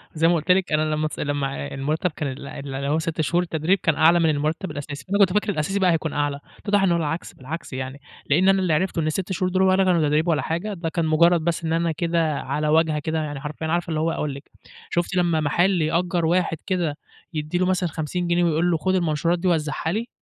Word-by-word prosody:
زي 165 +1 +3
ما 175 - +4
قُلت 170 +3 +1
لِك 185 -2 +2
أنا 155 0 +1
لمّا 155 0 0
س - - -8
لمّا 135 - -2
المرتب 155 +5 -1
كان 145 -3 -4
ال 140 +1 -8
ال 140 -1 -7
اللي 140 +1 -3
هو 155 +2 +2
6 160 -1 -2
شهور 170 +3 +1
التدريب 165 +3 0
كان 165 - +2
أعلى 165 +2 +5
من 165 -1 +3
المرتب 155 +4 -1
الأساسي، 145 0 -7
فأنا 200 +2 0
كنت 195 -2 +5
فاكر 210 0 +1
الأساسي 195 +3 -1
بقى 185 -2 +4
هيكون 160 -2 -1
أعلى، 145 -1 -1 0.2
اتضح 205 -1 +1
إن 185 - +3
هو 170 - +3
العكس، 165 +1 -3
بالعكس 145 +2 -7
يعني، 130 +2 -5 0.3
لأن 180 +7 +4
أنا 195 0 +4
اللي 175 -4 +1
عرفته 185 +1 0
إن 155 - -1
ال6 185 +4 -2
شهور 185 0 0
دُول 190 +1 +1
ولا 190 0 +4
كانوا 180 -3 +3
تدريب 155 +3 +1
ولا 155 -3 +2
حاجة، 180 +6 -3
ده 170 -3 -3
كان 165 +1 -1
مجرد 170 +2 +4
بس 165 +1 -1
إن 160 - 0
أنا 170 0 +1
كده 165 -1 0
على 150 0 -2
واجهة 155 0 +3
كده 160 +2 -2
يعني 145 -2 -5
حرفيًا 155 +2 -5
عارفة 170 +1 -1
اللي 155 -1 -1
هو 165 +1 +1
أقول 150 -3 -2
لِك، 140 - -12 0.4
شُفتِ 175 +1 -1
لمّا 170 -3 +2
محل 175 +4 +2
يأجّر 170 +2 0
واحد 170 0 +1
كده، 175 -6 -1 0.4
يدّي 155 +2 -2
له 185 - +2
مثلًا 180 -2 +1
50 165 +4 -3
جنيه 175 0 +2
ويقول 170 +1 +2
له 165 - +2
خُد 185 +4 0
المنشورات 170 0 +1
دي 185 - -1
وزّعها 160 -1 0
لي؟ 225 +5 -2
165 Hz, 245 wpm, -23 LUFS, 150-180 Hz, 0.4 s, أعلى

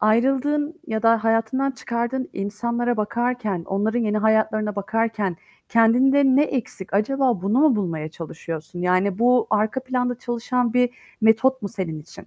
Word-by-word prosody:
ayrıldığın 275 +8 +1
ya 220 -4 -3
da 230 -1 +3
hayatından 225 +5 +1
çıkardığın 240 +1 -3
insanlara 235 +4 -2
bakarken, 215 -3 -2
onların 210 +4 0
yeni 215 -2 0
hayatlarına 215 -1 +1
bakarken 210 -2 -1 0.3
kendinde 250 +5 +4
ne 270 +1 +5
eksik 235 -10 -4
acaba 245 0 +1
bunu 205 +6 +1
mu 295 -6 +4
bulmaya 165 -6 -3
çalışıyorsun, 165 +1 -8
yani, 185 +2 +1
bu 245 0 +3
arka 215 +4 +1
planda 250 -1 -1
çalışan 240 0 -1
bir 250 0 +3 0.3
metot 230 +4 +3
mu 200 - -3
senin 165 -5 -5
için? 150 - -14
225 Hz, 140 wpm, -22 LUFS, 205-250 Hz, 0.3 s, ne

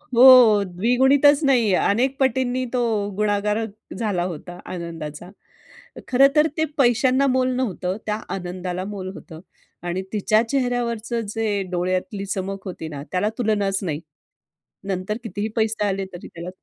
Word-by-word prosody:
हो, 240 -5 +8
द्विगुणितच 265 - +3
नाही 240 -7 +3
अनेक 255 +6 +1
पटींनी 255 -1 +1
तो 250 - +1 0.4
गुणाकार 210 +1 0 0.3
झाला 205 -6 -1
होता 175 0 -7
आनंदाचा. 170 -2 -7 0.8
खरंतर 275 +4 +4
ते 315 - +2
पैशांना 260 +1 +3
मोल 255 -1 +2
नव्हतं. 195 -7 -2
त्या 210 -1 -1 0.2
आनंदाला 180 0 -4
मोल 195 -2 -6
होतं 160 -2 -11 0.5
आणि 180 +2 -2
तिच्या 215 +1 +3
चेहऱ्यावरचं 240 -3 -1
जे 215 -3 0
डोळ्यातली 185 +4 -2
चमक 195 0 -4
होती 170 -3 -6
ना 145 -2 -7
त्याला 185 +3 +1
तुलनाच 205 -4 +1
नाही. 155 -5 -2 0.9
नंतर 190 +2 -2
कितीही 205 -1 -3
पैसे 220 -2 0
आले 195 -1 -1
तरी 175 - -9
त्याला 170 +2 -8
210 Hz, 130 wpm, -22 LUFS, 185-245 Hz, 0.9 s, हो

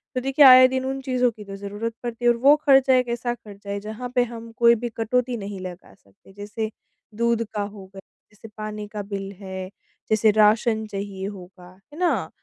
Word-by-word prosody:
तो 255 - 0
देखिए 270 +2 +4
आए 255 0 +10
दिन 260 0 -2
उन 270 0 -3
चीज़ों 250 -2 +1
की 210 -1 -12
तो 195 0 -8
जरूरत 205 +3 -5
पड़ती 240 0 -5
है - - +6
और 235 - -1
वो 280 +5 +6
खर्चा 270 -1 +5
एक 250 -1 +2
ऐसा 240 0 -2
खर्चा 205 -3 -13
है 200 0 -2
जहाँ 220 +4 -7
पे 245 - +4
हम 230 0 -9
कोई 235 0 +6
भी 240 - -1
कटौती 245 +2 0
नहीं 200 -1 -7
लगा 180 - -9
सकते। 100 - -23
जैसे 210 +2 -5 0.5
दूध 235 0 +1
का 210 - -2
हो 200 -1 -7
गया, 195 +1 -13 0.3
जैसे 215 +1 -14
पानी 210 -1 -6
का 210 0 -6
बिल 195 -1 -6
है, 190 -1 -7 0.4
जैसे 215 0 +4
राशन 220 +1 +3
चाहिए 195 -1 -6
होगा। 180 -2 -11 0.2
है 320 - -10
ना? 360 - 0
220 Hz, 210 wpm, -23 LUFS, 200-245 Hz, 0.5 s, आए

